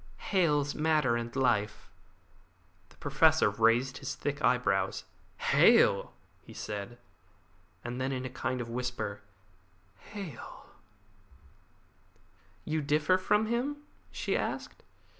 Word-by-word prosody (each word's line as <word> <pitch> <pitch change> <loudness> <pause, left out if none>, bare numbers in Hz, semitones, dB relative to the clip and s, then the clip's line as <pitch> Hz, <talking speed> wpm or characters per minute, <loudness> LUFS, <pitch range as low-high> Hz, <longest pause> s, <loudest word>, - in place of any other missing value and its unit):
"Hale's 150 -7 +1
Matter 150 -5 +2
and 120 +1 -4
Life." 110 -6 0 1.0
The - - -21
Professor - - +3
raised 120 +4 +2
his 135 - -5
thick 145 +1 -4
eyebrows. 95 -6 +1 0.3
"Hale!" - - +4 0.3
he - - -14
said, 105 +3 -6 0.9
and 120 +1 -5
then 130 +1 -1
again 130 -1 -3
in 130 - -5
a - - -21
kind 130 0 -2
of 120 - -6
whisper, 125 -5 -4 0.8
"Hale!" 195 - -9 2.0
"You 155 0 -1
differ 150 +5 +2
from 210 +3 +2
him?" 265 +6 -2 0.3
she - - -2
asked. - - -4
130 Hz, 110 wpm, -30 LUFS, 120-155 Hz, 2.0 s, Hale